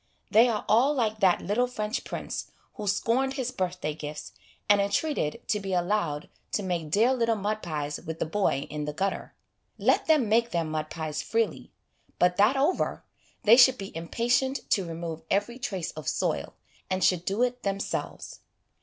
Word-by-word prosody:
They 230 +3 +6
are 215 -3 -2
all 245 +8 +4
like 220 -4 0
that 190 -4 +4
little 225 +7 +1
French 215 -1 -3
prince - - -5 0.2
who 210 - -6
scorned 240 +7 +1
his 255 -2 -2
birthday 180 -6 -2
gifts, 150 0 -7 0.4
and 205 -1 +5
entreated 200 - -1
to 210 - +2
be 195 -1 -4
allowed 175 -5 0 0.3
to 205 - 0
make 175 -4 -2
dear 225 +10 +4
little 230 -3 +1
mud 215 +1 -2
pies 150 -4 -3
with 160 0 -6
the - - -1
boy 160 -5 0
in 150 -1 -3
the 150 - -4
gutter. 195 +5 -3 0.4
Let - - +2
them 305 -7 +4
make 230 +2 +3
their 170 -6 0
mud 155 -1 -3
pies 155 -2 -4
freely; 225 -1 -1 0.5
but 180 0 +3
that 215 +7 +4
over, 290 +7 0 0.4
they 225 +3 +7
should 255 0 +7
be 195 -3 -8
impatient 245 +10 0
to 190 -4 +2
remove 165 -1 -5
every 220 +5 0
trace 190 -8 -3
of 155 -3 -9
soil, - - -1 0.3
and 185 0 0
should 180 -2 +3
do 200 +6 0
it 250 0 -1
themselves. 195 -1 -4
200 Hz, 175 wpm, -27 LUFS, 170-235 Hz, 0.5 s, they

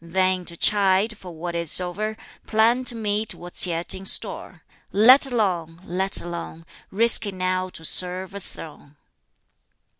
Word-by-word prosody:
Vain 185 +1 0
to 170 -1 -7
chide 200 +2 +2
for 185 -3 -11
what 170 +1 -6
is 170 -1 +2
o'er, 210 +5 -4 0.3
Plan 230 +3 +2
to 245 - -2
meet 215 -1 -2
what's 175 +1 -1
yet 170 0 -3
in 190 - -8
store. 195 - 0 0.3
Let 255 +7 +6
alone! 180 -9 -2
Let 190 +2 -1
alone! 170 -1 -8 0.2
Risky 220 0 +2
now 185 0 -2
to 165 -2 -9
serve 185 +3 +1
a 200 - -6
throne." 150 -5 -12
185 Hz, 145 wpm, -23 LUFS, 175-210 Hz, 0.3 s, Let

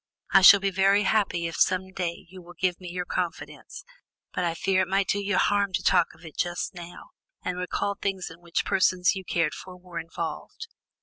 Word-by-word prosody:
I 195 - +7
shall 200 +2 +10
be 195 0 -1
very 195 +2 +3
happy 195 -5 +1
if 165 - -4
some 190 0 +1
day 175 -2 -4
you 185 +1 -12
will 175 0 -14
give 180 -1 0
me 180 - -7
your 180 0 -4
confidence, 175 -2 -5 0.5
but 180 - -1
I 170 -1 -1
fear 190 +2 +1
it 185 - -1
might 195 +1 +1
do 205 - +1
you 200 0 0
harm 200 -1 +2
to - - -1
talk 170 - +3
of 165 +1 -17
it 160 - -11
just 175 0 -2
now, 175 - -11 0.3
and 180 0 -3
recall 200 +2 -2
things 195 -3 -4
in 165 +1 -14
which 170 -1 -2
persons 185 -1 +2
you 190 - -6
cared 165 -3 0
for 185 -1 -10
were 180 -2 -8
involved?" 165 - -6
185 Hz, 210 wpm, -26 LUFS, 175-195 Hz, 0.5 s, shall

